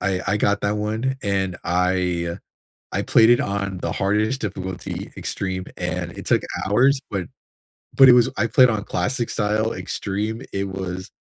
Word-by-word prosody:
I 95 -3 0
I 105 - +2
got 105 0 +1
that 105 +1 0
one 110 +5 -1
and 95 -3 -1
I 90 -1 0 0.5
I - - 0
played 110 +1 +5
it 120 - +5
on 100 -2 -2
the - - -3
hardest 105 +6 0
difficulty, 95 -3 -5
extreme, 95 -1 -3
and 90 0 -3
it - - -8
took - - +3 0.2
hours, 130 +8 +3
but 95 -3 -2 0.7
but 135 -1 +8
it - - +10
was 120 -1 +5
I 120 - +1
played 125 +1 +5
on 105 -2 -2
classic 125 -2 -2
style 110 +1 0
extreme, 100 +5 -3
it 100 0 -2
was 95 -1 -5
100 Hz, 165 wpm, -22 LUFS, 95-110 Hz, 0.7 s, it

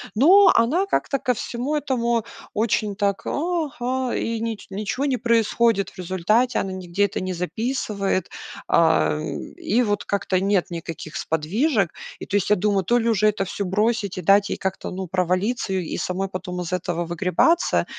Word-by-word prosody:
Но 365 - +7
она 300 +12 +2
как-то 280 -7 0
ко 255 - 0
всему 245 +5 -3
этому 235 -6 0 0.3
очень 215 -1 0
так: 200 0 0
"Ага", 260 -6 -2
и 230 0 -2
нич 225 -3 -4
ничего 210 +7 -2
не 270 -3 +1
происходит 230 -2 +2
в - - -21
результате. 190 +7 +1
Она 195 - -2
нигде 185 +1 -2
это 200 - -3
не 185 0 -3
записывает, 195 - -2 0.4
а, 160 -2 +3 0.4
и 240 +5 +1
вот 205 -2 -1
как-то 195 -2 0
нет 195 -2 +2
никаких 165 -2 -7
сподвижек. 195 - 0 0.3
И - - -6
то - - -3
есть, 200 - -1
я 210 - +5
думаю, 200 0 +1
то 240 +7 +2
ли 235 -1 +1
уже 215 -2 +3
это 205 -2 0
всё 200 - -4
бросить 210 +1 0
и - - -3
дать 200 +3 +4
ей - - -2
как-то, 190 -1 -4
ну, 185 0 -5
провалиться 185 +5 0
и 185 -4 -2
самой 185 +2 -2
потом 180 -1 -5
из 180 +1 -5
этого 175 -1 -2
выгребаться, 180 - +2
205 Hz, 170 wpm, -23 LUFS, 185-235 Hz, 0.4 s, Но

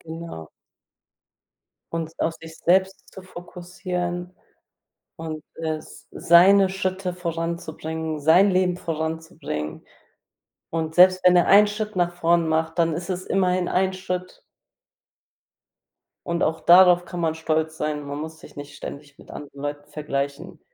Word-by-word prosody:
Genau. 160 - -9 1.4
Uns 165 -1 -4
auf 165 - 0
sich 160 0 -11
selbst 190 +2 +1
zu 190 - -10
fokussieren 180 0 -6 0.8
und, 155 -1 -7
äh, 160 -1 -3
s 155 - -14
seine 190 +3 +5
Schritte 185 -1 -3
voranzubringen, 160 -2 -4
sein 175 +7 +5
Leben 185 -1 +1
voranzubringen, 160 - -5 0.8
und 160 -1 -3
selbst 185 +1 +6
wenn 180 0 +6
er 175 - +4
einen 205 +1 +7
Schritt 210 0 -4
nach 175 -1 +1
vorn 170 -1 +2
macht, 160 +1 -1
dann 165 -2 +2
ist 175 +3 -5
es 185 0 -4
immerhin 185 -2 +1
ein 190 +1 +1
Schritt. 185 -1 -5 1.8
und 170 0 -2
auch 160 +1 0
darauf 180 0 +7
kann 175 - -7
man 160 -1 0
stolz 160 0 -1
sein. 150 -1 -3
Man 145 +1 -5
muss 160 +1 -7
sich 150 - -15
nicht 145 0 -9
ständig 145 0 -9
mit - - -16
anderen 140 -1 -10
Leuten 145 0 -5
vergleichen. 150 +3 -4
170 Hz, 135 wpm, -23 LUFS, 160-180 Hz, 1.8 s, einen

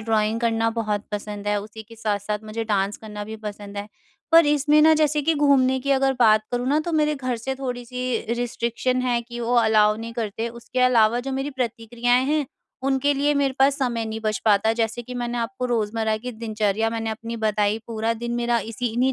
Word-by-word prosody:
Drawing 220 0 0
करना 225 -1 +1
बहुत 215 -2 -2
पसंद 205 0 -5
है। 205 0 +1
उसी 215 +2 -10
के 230 +1 -15
साथ-साथ 210 -1 -2
मुझे 225 +1 -4
डांस 200 -1 0
करना 210 -1 -7
भी 220 +1 -7
पसंद 205 -1 -8
है। 200 +1 -5 0.4
पर 330 -2 +8
इसमें 295 +1 +4
ना 315 +1 +7
जैसे 300 -1 +2
कि 325 +2 +2
घूमने 270 -3 +3
की 280 +2 -2
अगर 270 0 +3
बात 215 -2 +5
करूँ 245 0 -1
ना 295 +2 +3
तो 340 +2 -4
मेरे 300 -1 +2
घर 255 -3 -2
से 265 +4 -4
थोड़ी-सी 250 -1 -3
रिस्ट्रिक्शन 245 +1 -1
है 245 -2 +1
कि 240 0 -8
वो 235 +1 0
अलाउ 215 -2 +4
नहीं 230 +1 -6
करते। 225 0 -3
उसके 235 +2 -5
अलावा 240 -2 +4
जो 270 - -2
मेरी 270 +2 -2
प्रतिक्रियाएँ 245 0 0
हैं, 300 -1 +1 0.4
उनके 270 +1 +2
लिए 290 +2 +1
मेरे 275 -2 +1
पास 275 +2 +4
समय 240 -4 -1
नहीं 220 0 -5
बच 215 -2 -1
पाता 215 0 +4
जैसे 225 +1 -1
कि 250 +2 -8
मैंने 240 0 -3
आपको 250 +2 -3
रोज़मर्रा 220 -2 0
की 250 +3 -6
दिनचर्या 220 -1 -1
मैंने 225 -1 -2
अपनी 230 +1 -5
बताई, 215 -1 +1
पूरा 225 0 -1
दिन 235 +1 -4
मेरा 240 0 +1
इसी 230 +2 -4
इन्हीं 255 +2 +2
235 Hz, 205 wpm, -23 LUFS, 220-255 Hz, 0.4 s, पर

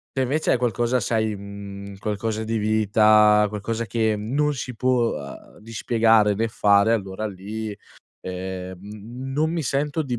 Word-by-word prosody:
Se, 135 - +1
invece, 150 +5 +1
è - - +2
qualcosa, 120 +1 0
sai, 110 -3 0
mhmm, 100 0 -9
qualcosa 105 +2 -3
di 110 0 -2
vita, 105 0 +4
qualcosa 110 +2 -3
che 110 -2 +1
non 140 +8 0
si 125 -2 -6
può, 125 -1 +2
uhm, 70 -1 -11
di 115 +2 -12
spiegare 110 -3 +3
né 115 +2 0
fare, 100 +1 +3
allora 100 -1 -3
lì, 105 +2 -6 0.5
ehm, 95 0 -6
n 115 +6 -8
non 155 +4 +1
mi 170 - -1
sento 145 +3 -1
di 125 -4 -3
110 Hz, 160 wpm, -23 LUFS, 100-120 Hz, 0.5 s, vita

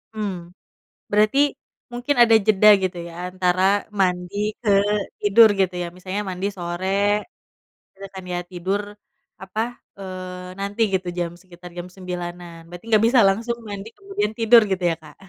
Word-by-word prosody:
Mmm. 205 -3 -2 0.8
Berarti 210 +5 +3 0.5
mungkin 245 +4 -1
ada 230 -1 +6
jeda 210 0 +5
gitu 185 -1 -2
ya, 170 - -11 0.2
antara 185 0 0 0.4
mandi 180 0 0 0.3
ke 215 - -1 0.5
tidur, 215 +2 +7
gitu 185 -1 +2
ya? 175 - -3
Misalnya 185 +3 -4
mandi 185 +2 -3
sore, 175 +2 -4 1.1
terus 195 0 -10
kan 190 - -7
ya - - -1
tidur 190 +3 -2 0.6
apa, 205 +3 -3 0.4
eee, 185 -1 -8
nanti 200 +3 -3
gitu 185 -1 -1
jam, 170 -1 -1
sekitar 180 -1 -13
jam 175 +1 -5
9.00-an. 175 -2 -7
Berarti 175 +4 -11
nggak 215 -1 +4
bisa 245 0 +4
langsung 230 +4 0
mandi 200 +1 -7
kemudian 390 - -3
tidur 230 0 +7
gitu 185 -1 -1
ya, - - -2
Kak? 150 -2 -15
190 Hz, 150 wpm, -22 LUFS, 180-210 Hz, 1.1 s, tidur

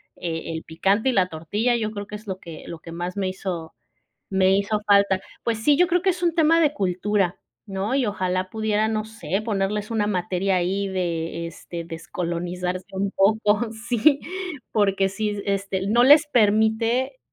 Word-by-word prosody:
e 165 -1 -4
el 160 - -5
picante 195 +9 +1
y - - +3
la 190 -6 +3
tortilla, 205 +9 -1
yo 215 -2 -1
creo 205 -2 -6
que 210 - -7
es 210 +1 -11
lo 190 -1 -4
que 165 -3 -10
lo 170 - -7
que 165 0 -10
más 175 +3 -4
me 195 -1 0
hizo 185 -3 -5 0.6
me 190 0 +4
hizo 205 +2 0
falta. 200 -2 +4 0.2
Pues 230 -2 -1
sí, 295 -1 +5
yo 355 +3 +4
creo 355 0 +2
que 375 +2 +2
es 355 -1 -4
un 340 -2 +2
tema 330 +1 +5
de 300 -3 +3
cultura, 190 0 0 0.3
¿no? 195 +4 -2
Y 270 -2 +2
ojalá 185 -2 -1
pudieran, 220 0 0
no 215 0 -1
sé, 210 -3 -3
ponerles 210 0 -1
una 215 -2 +1
materia 185 -1 0
ahí 190 +3 0
de, 170 -3 -2
este, 170 +1 -7
descolonizarse 175 +2 -4
un 195 +1 -1
poco, 210 +3 +2
sí, 240 +5 +2 0.5
porque 195 -2 +2
sí, 205 +1 -2
este, 195 -1 -1
no 235 +4 +4
les 295 +3 +7
permite, 225 - +2
200 Hz, 180 wpm, -24 LUFS, 180-220 Hz, 0.6 s, les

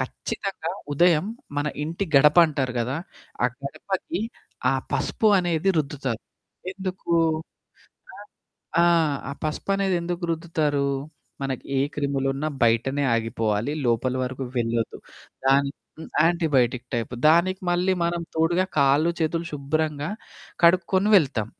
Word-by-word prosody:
ఖచ్చితంగా 190 -4 -4 0.2
ఉదయం 170 +2 +4 0.3
మన 145 +1 0 0.2
ఇంటి 170 +5 -3
గడపంటారు 150 -3 +5
గదా! 130 +5 -1 0.5
ఆ - - +7 0.2
గడపకి 170 +5 -4 0.5
ఆ - - +2 0.2
పసుపు 220 - +1
అనేది 175 +1 0
రుద్దుతారు. 135 -5 -2 0.5
ఎందుకు? 185 -3 -3 1.0
ఆ! - - -12 0.7
ఆ! - - +6 0.5
ఆ - - -3
పసుపనేది 195 +4 0
ఎందుకు 175 +1 -4
రుద్దుతారు? 155 -4 0 0.6
మనకి 135 -2 -3
ఏ - - +2
క్రిములున్నా 140 0 -1
బయటనే 120 +5 +2
ఆగిపోవాలి 115 +1 -1
లోపల 120 +2 +1
వరకు 130 +1 -4
వెళ్ళొద్దు. 115 -1 -1 0.5
దానికి 140 +1 +3 0.2
హ్మ్. - - -8 0.2
యాంటిబయోటిక్ 135 -8 +2
టైపు 120 +1 -2
దానికి 175 +4 +3
మళ్ళీ 180 +2 +2
మనం 170 0 -1
తోడుగా 175 +3 +2
కాళ్ళు 145 +5 +4
చేతులు 165 +1 0
శుభ్రంగా 150 +2 -1 0.5
కడుక్కొని 185 +4 +4
వెళ్తాం. 130 - -1
150 Hz, 110 wpm, -24 LUFS, 135-170 Hz, 1.0 s, ఆ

